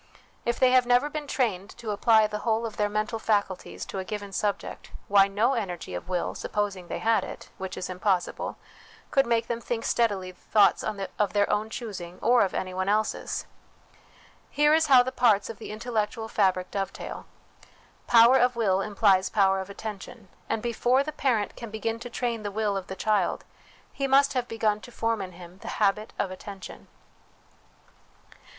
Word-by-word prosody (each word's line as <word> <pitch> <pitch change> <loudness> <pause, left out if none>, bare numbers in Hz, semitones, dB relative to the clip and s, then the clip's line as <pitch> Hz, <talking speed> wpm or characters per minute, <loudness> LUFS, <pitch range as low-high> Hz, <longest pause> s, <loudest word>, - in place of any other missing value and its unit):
If 235 0 0
they 255 -1 +5
have 255 -1 +4
never 245 +4 +3
been 300 -1 -5
trained 210 -9 -1
to 225 -3 -4
apply 220 +1 +4
the 210 0 -3
whole 225 +1 0
of 220 - -6
their 210 0 +1
mental 215 +2 -2
faculties 205 -4 -1
to 195 - -5
a - - -3
given 205 +1 -6
subject, 200 +1 -3 0.2
why, 200 -1 +6
no 215 +6 +1
energy 180 - -4
of 90 - -6
will, 180 -2 -1
supposing 200 -4 -3
they - - -4
had 225 0 +2
it, - - -9
which 190 0 -5
is 185 - -4
impossible, 185 -1 -1 0.5
could 270 -3 +3
make 230 -1 +2
them 235 -1 -3
think 235 -1 -3
steadily 200 -6 +1
thoughts 205 +3 +3
of 195 -1 -2
their 205 -1 +3
own 215 +1 0
choosing 185 -7 -7
or 245 +1 +4
of 195 - +1
anyone 185 +1 -2
else's. 215 +1 -1 1.0
Here 295 +1 +3
is 320 0 +4
how 260 -3 +7
the 260 - -3
parts 225 -5 +3
of 225 - -13
the - - -8
intellectual 220 0 -2
fabric 185 -4 +1
dovetail: 195 -1 -5 0.8
power 235 +2 +7
of 250 0 +3
will 195 -5 +2
implies 200 -2 +3
power 195 -2 +3
of 190 +1 -6
attention; 205 0 -8 0.2
and 220 - -1
before 245 +3 +2
the 305 - -4
parent 250 -8 0
can 235 - -8
begin 225 +1 -3
to 245 +1 -7
train 235 -1 -2
the 205 - -3
will 205 0 -1
of 190 -1 -4
the 190 - -6
child, 210 +2 0 0.5
he 275 - -1
must 275 +1 +4
have 250 -2 -1
begun 215 -2 0
to 245 - -11
form 230 -1 -1
intiim 180 -1 -9
the - - -11
habit 210 +1 +1
of 190 - -1
attention. 190 +1 -9
215 Hz, 180 wpm, -27 LUFS, 195-235 Hz, 1.0 s, how